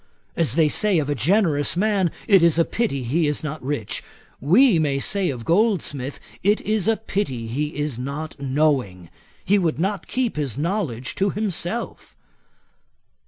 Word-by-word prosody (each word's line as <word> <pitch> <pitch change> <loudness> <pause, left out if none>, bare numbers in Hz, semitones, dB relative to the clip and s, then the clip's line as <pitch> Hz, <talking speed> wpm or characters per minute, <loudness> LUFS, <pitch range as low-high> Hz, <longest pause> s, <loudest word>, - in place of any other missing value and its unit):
As 165 -5 +1
they 160 -2 +4
say 200 +5 +2
of 145 -2 0
a - - +3
generous 155 - +1
man, 200 -2 +2 0.2
it 195 -5 +6
is 170 -1 +4
a 165 - +4
pity 210 - -2
he 150 +7 +1
is 145 +1 -1
not 155 -1 -5
rich, 135 -6 -3 0.4
we 185 - +5
may 145 -3 +1
say 190 +6 0
of 120 -5 -5
Goldsmith, 165 - 0 0.2
it 205 +3 +3
is 215 -1 0
a 225 -1 +3
pity 160 - -3
he 145 +7 -3
is 145 -5 -2
not 140 +4 -5
knowing. 130 - 0 0.3
He 205 +1 +3
would 165 -8 0
not 195 +3 -2
keep 250 -9 -1
his 140 -6 -2
knowledge 150 - -2
to 195 +1 0
himself.' 205 +1 -3
155 Hz, 165 wpm, -22 LUFS, 140-200 Hz, 0.4 s, it